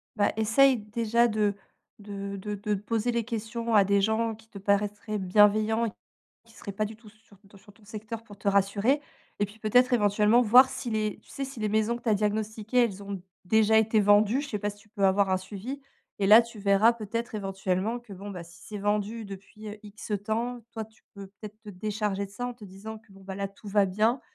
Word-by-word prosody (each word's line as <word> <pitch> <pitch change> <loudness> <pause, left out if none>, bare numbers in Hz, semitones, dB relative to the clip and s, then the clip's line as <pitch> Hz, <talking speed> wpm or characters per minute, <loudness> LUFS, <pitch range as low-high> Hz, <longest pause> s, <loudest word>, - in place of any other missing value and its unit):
Bah 205 -2 +2
essaye 250 +5 +4
déjà 230 +2 +1
de 210 -2 0 0.4
de 200 -1 -6
de 210 +2 -5
de 210 +1 -2
de - - -5
poser 225 +2 -1
les 235 -1 0
questions 230 0 -3
à 205 - +7
des 200 +1 +2
gens 220 +2 0
qui 220 +1 -20
te 200 -3 -11
paraitraient 205 +2 -1
bienveillants 215 +4 +3
et - - -2 0.6
qui 230 - -20
seraient 200 - -8
pas 215 +2 -1
du 215 +1 -9
tout 220 -2 -16
sur 215 -2 -23
ton 200 0 -17
sur 205 +1 -18
ton 215 - -23
secteur 220 +1 -7
pour 205 -3 -14
te 200 - -1
rassurer 200 +8 +2 0.4
et - - +4
puis 205 +3 -16
peut-être 245 +4 +3
éventuellement, 210 0 +4
voir 250 +3 +7
si - - -5
les 215 -2 -1
tu - - -27
sais 275 - -5
si 270 -4 -8
les 215 - 0
maisons 220 +2 +1
que - - -21
tu - - -1
as 215 - +4
diagnostiquées, 215 +3 0
elles 200 -3 -4
ont 200 -1 -6 0.2
déjà 220 +3 +4
été 220 0 +3
vendues. 205 +5 +4
Je 285 - -6
sais 210 - -3
pas 205 +1 -2
si 205 - -14
tu 210 +1 -22
peux 205 -2 -2
avoir 195 +1 +3
un 185 - +3
suivi 210 +9 -7 0.4
et 195 - +2
là, 215 +3 +10
tu 235 -1 -12
verras 200 +3 +4
peut-être, 230 +1 -5
éventuellement, 195 +2 -2
que, 240 -4 -14
bon, 195 +2 -8
bah 180 -3 -7
si 170 +2 -17
c'est 210 -1 -7
vendu 210 +2 -1
depuis, 200 +2 -11
heu, 210 +1 -8
X 210 0 -9
temps, 235 +3 -2
toi, 220 -1 -4
tu 220 +1 -24
peux 200 -1 -9
peut-être 205 +2 -12
te - - -11
décharger 205 0 -2
de 195 - -11
ça, 245 +5 -4
en 245 - -5
te 230 -3 -13
disant 205 +3 -9
que 220 -2 -23
bon 195 - -16
bah 190 0 -6
là, 200 0 -3
tout 200 +2 -18
va 200 0 +3
bien, 215 +7 +1
210 Hz, 235 wpm, -27 LUFS, 200-225 Hz, 0.6 s, là